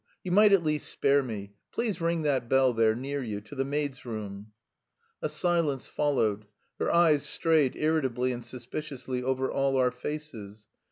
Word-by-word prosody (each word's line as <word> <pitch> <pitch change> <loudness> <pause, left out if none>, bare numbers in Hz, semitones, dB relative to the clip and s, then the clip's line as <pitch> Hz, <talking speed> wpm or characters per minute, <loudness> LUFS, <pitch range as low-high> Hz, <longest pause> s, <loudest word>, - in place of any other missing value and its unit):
You 180 - -4
might 210 +3 +6
at 195 -3 +5
least 150 -1 +1
spare 140 +1 +3
me.... 105 -6 -6 0.2
Please 215 -7 -2
ring 165 -1 0
that 130 -5 0
bell 135 -1 +4
there, 110 -1 +3
near 140 +3 -3
you, 110 -5 -4
to 110 - -13
the 135 -1 -1
maid's 140 -1 -3
room." 105 -3 -6 0.7
A - - -1
silence 165 -6 0
followed. 110 -8 0 0.3
Her - - 0
eyes 160 -4 +4
strayed 155 -5 +2
irritably 130 -5 0
and 120 -1 -5
suspiciously 125 +1 -5
over 130 +1 -1
all 135 -1 +1
our 125 -1 +3
faces. 125 -7 -6
135 Hz, 165 wpm, -28 LUFS, 120-150 Hz, 0.7 s, might